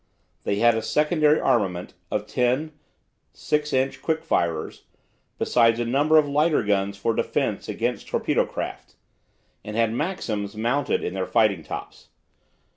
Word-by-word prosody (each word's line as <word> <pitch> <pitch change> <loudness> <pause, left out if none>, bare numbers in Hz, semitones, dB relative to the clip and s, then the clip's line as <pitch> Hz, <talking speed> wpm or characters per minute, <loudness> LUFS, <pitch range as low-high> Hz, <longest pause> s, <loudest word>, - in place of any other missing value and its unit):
They 100 - +1
had 120 +3 +4
a 110 - -1
secondary 150 +4 +2
armament 95 -6 0 0.2
of 105 0 -2
ten 125 +7 0 0.6
6 150 0 -1
inch 130 +1 0
quick 160 -1 -1
firers, 80 -2 -1 0.5
besides 115 -1 +3
a 120 - 0
number 145 +6 +3
of 150 -2 +4
lighter 150 0 +2
guns 100 -1 0
for 115 +3 0
defence - - -1
against - - -2
torpedo - - 0
craft, - - -6 0.7
and 105 +1 -7
had 115 -1 +2
maxims 115 - -3
mounted 125 +5 0
in 90 - -3
their 95 -1 -2
fighting 105 -7 +2
tops. - - -8
115 Hz, 140 wpm, -24 LUFS, 105-150 Hz, 0.7 s, had